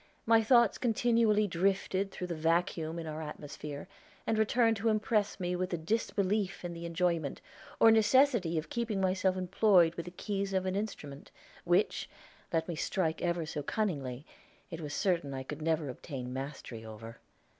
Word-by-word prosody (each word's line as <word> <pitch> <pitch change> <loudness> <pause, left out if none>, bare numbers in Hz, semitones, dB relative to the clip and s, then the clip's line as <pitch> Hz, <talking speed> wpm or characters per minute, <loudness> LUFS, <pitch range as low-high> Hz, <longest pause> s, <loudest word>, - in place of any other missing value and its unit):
My 225 0 +5
thoughts 235 -1 +4
continually 230 -3 +3
drifted 195 +1 0
through 180 - -5
the 180 - -3
vacuum 165 0 0
in 165 - -5
our 155 0 -5
atmosphere, 150 -1 -7 0.4
and 225 - +1
returned 225 +1 +3
to 225 +3 +1
impress 215 -1 +1
me 180 -1 -1
with 180 +1 -2
a - - +1
disbelief 200 +1 -1
in 175 - -4
the 170 0 -6
enjoyment, 170 -3 0 0.4
or 225 - +8
necessity 220 - +4
of 155 0 -4
keeping 230 -4 -1
myself 185 0 +1
employed 185 -2 +4
with 170 -1 -6
the - - -6
keys 195 +1 -3
of 190 -1 +1
an 185 0 -1
instrument, 150 -9 -5 0.4
which, 175 +4 +1 0.4
let 160 -1 0
me 175 - -3
strike 160 0 -1
ever 170 -1 0
so 150 -1 -4
cunningly, 145 - -2 0.5
it 165 -1 -6
was 145 -1 -5
certain 170 -8 0
I 130 - -4
could 150 +3 -7
never 160 -1 0
obtain 125 -1 -6
mastery 135 -4 -6
over. 110 +1 -10
180 Hz, 165 wpm, -31 LUFS, 155-205 Hz, 0.5 s, or